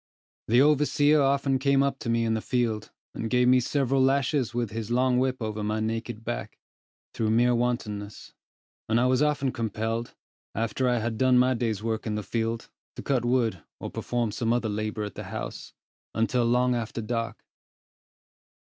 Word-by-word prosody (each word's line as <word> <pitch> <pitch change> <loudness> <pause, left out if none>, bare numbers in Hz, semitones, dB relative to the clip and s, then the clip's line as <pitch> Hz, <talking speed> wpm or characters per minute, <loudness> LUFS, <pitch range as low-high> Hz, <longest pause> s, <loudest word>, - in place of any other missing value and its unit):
The 120 +4 +5
overseer 150 0 +4
often 135 -1 +2
came 140 0 +3
up 140 -1 -1
to 115 - -4
me 115 0 +2
in 110 - +1
the 110 - -1
field, 115 -4 -1 0.2
and 115 - -4
gave 125 0 +3
me 130 0 +6
several 135 +1 +1
lashes 135 -1 +2
with 120 -3 -2
his 110 0 -4
long 125 +1 +2
whip 130 0 0
over 110 -2 -3
my 105 +1 -1
naked 115 +1 -3
back, 120 - -4 0.6
through 110 -1 0
mere 120 +2 +4
wantonness; 110 -4 -3 0.6
and 115 +1 +3
I 125 - +3
was 130 +2 +3
often 150 -3 +1
compelled, 115 +1 -3 0.4
after 115 +3 0
I 120 - +2
had 110 -1 -2
done 130 -1 +4
my 125 +1 +4
day's 115 -4 -2
work 115 0 -2
in 105 - -1
the 105 - -3
field, 115 +2 -2 0.3
to - - -7
cut 135 -4 +1
wood, 120 -7 +1 0.2
or - - -6
perform 120 -3 -2
some 115 +2 -1
other 120 -2 +1
labor 105 +1 -2
at 105 -2 -5
the - - -7
house, - - -7 0.4
until 120 +2 +1
long 125 +1 +3
after 115 -1 -3
dark. 115 0 -3
120 Hz, 180 wpm, -27 LUFS, 110-130 Hz, 0.6 s, me